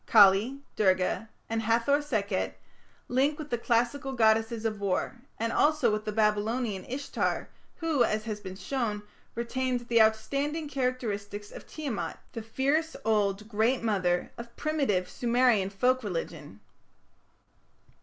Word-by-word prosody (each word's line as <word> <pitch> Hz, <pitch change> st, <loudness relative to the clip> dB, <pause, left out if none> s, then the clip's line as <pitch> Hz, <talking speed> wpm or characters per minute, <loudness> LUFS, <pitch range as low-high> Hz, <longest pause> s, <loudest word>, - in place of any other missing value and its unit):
Kali, 215 Hz, +6 st, +5 dB
Durga, 190 Hz, +2 st, +1 dB, 0.2 s
and 225 Hz, 0 st, -1 dB
Hathor 230 Hz, +6 st, +2 dB
Sekhet 210 Hz, -9 st, -2 dB, 0.5 s
link 275 Hz, +4 st, +2 dB
with 300 Hz, -2 st, -8 dB
the 240 Hz, -, +1 dB
classical 245 Hz, +4 st, 0 dB
goddesses 225 Hz, -1 st, +2 dB
of 215 Hz, -2 st, -1 dB
war, 200 Hz, +5 st, -1 dB, 0.2 s
and 230 Hz, +1 st, -1 dB
also 300 Hz, -6 st, +3 dB
with 215 Hz, 0 st, -2 dB
the 215 Hz, -, -1 dB
Babylonian 210 Hz, 0 st, 0 dB
Ishtar, 275 Hz, +3 st, -2 dB, 0.3 s
who, 320 Hz, -7 st, +1 dB
as 215 Hz, -1 st, 0 dB
has 215 Hz, -2 st, -4 dB
been 190 Hz, -2 st, -8 dB
shown, 210 Hz, +1 st, -2 dB, 0.3 s
retained 250 Hz, +1 st, -1 dB
the 235 Hz, -1 st, +3 dB
outstanding 280 Hz, +8 st, +1 dB
characteristics 210 Hz, -7 st, -3 dB
of -, -, -11 dB
Tiamat, 280 Hz, -9 st, -4 dB, 0.2 s
the 230 Hz, -, -4 dB
fierce 280 Hz, +8 st, 0 dB
old 210 Hz, -1 st, +1 dB
"Great 230 Hz, +3 st, +1 dB
Mother" 185 Hz, -5 st, +1 dB
of 235 Hz, 0 st, -9 dB
primitive 275 Hz, -13 st, 0 dB
Sumerian 240 Hz, -5 st, +2 dB
folk 250 Hz, +6 st, +1 dB
religion. 165 Hz, -, -5 dB
225 Hz, 130 wpm, -29 LUFS, 210-260 Hz, 0.5 s, Kali